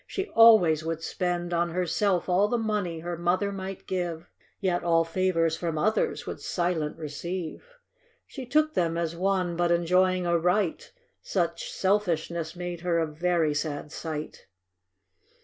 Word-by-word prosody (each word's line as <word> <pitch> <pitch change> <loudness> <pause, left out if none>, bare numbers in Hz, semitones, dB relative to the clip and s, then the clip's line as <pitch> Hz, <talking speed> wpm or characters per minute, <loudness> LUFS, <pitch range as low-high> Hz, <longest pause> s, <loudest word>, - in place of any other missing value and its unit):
She 390 +1 -4
always 200 -9 +6
would 165 0 -3
spend 175 -1 -2
On 170 0 +1
herself 180 +2 0
all 185 +3 +3
the 240 - 0
money 210 -7 -2
her 175 +1 -4
mother 180 +4 0
might 195 -1 -6
give, 175 -3 -4 0.3
Yet 180 -3 0
all 165 -1 +3
favors 165 -1 +1
from 165 -1 -3
others 215 +8 0
would - - -6
silent 170 -4 -1
receive. 165 +3 -5 0.6
She 265 -3 -8
took 310 +4 +2
them 170 - 0
as 170 -1 -2
one 185 -1 0
hut 175 0 +2
enjoying 180 +2 +2
a 170 -1 +2
right, 180 +1 0 0.2
— - - -46
Such - - -2
selfishness 170 - 0
made 175 -1 -5
her 175 -1 +1
a 165 - +2
very 160 0 0
sad 145 0 -3
sight. 155 -2 -6
175 Hz, 150 wpm, -27 LUFS, 165-190 Hz, 0.6 s, always